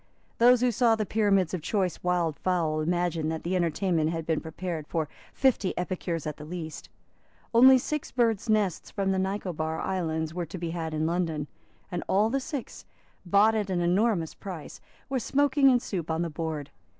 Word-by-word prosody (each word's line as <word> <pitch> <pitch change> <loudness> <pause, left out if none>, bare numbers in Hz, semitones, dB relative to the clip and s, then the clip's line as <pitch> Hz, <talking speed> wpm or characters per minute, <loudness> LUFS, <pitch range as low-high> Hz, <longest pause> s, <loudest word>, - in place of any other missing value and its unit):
Those 245 +1 +6
who 250 -1 +3
saw 230 0 +3
the 215 -1 -2
pyramids 195 -5 +2
of 180 - -2
choice 185 +1 -1
wild 175 -4 0
fowl 165 -4 0
imagined 170 -1 0
that 160 - -4
the 180 +2 -1
entertainment 170 -2 +1
had 165 -1 -3
been 160 -1 0
prepared 160 -1 -5
for 160 -3 -1 0.2
fifty 255 -8 +1
epicures 175 -3 -3
at 150 -1 -4
the 150 - -9
least. 160 0 -7 0.6
Only 260 +3 +8
six 300 +3 -3
birds' 230 -3 +1
nests 210 -5 +1
from 195 -1 -1
the 190 - +1
Nicobar 180 -5 -2
islands 160 -4 -2
were 175 -1 -3
to 175 - -7
be 170 -1 -3
had 165 -2 -3
in 155 +1 0
London; 165 -3 -1 0.5
and 175 -1 -3
all 210 +3 +3
the 275 - +1
six, 270 -1 -6 0.4
bought 205 +5 +5
at 210 -3 -1
an 180 -2 0
enormous 180 -1 +1
price, 180 -6 -8 0.3
were 265 -1 -1
smoking 275 +2 +3
in 250 -2 +4
soup 180 -8 -4
on 160 +1 0
the 170 - -3
board. 155 -2 -4
180 Hz, 185 wpm, -27 LUFS, 160-215 Hz, 0.6 s, Only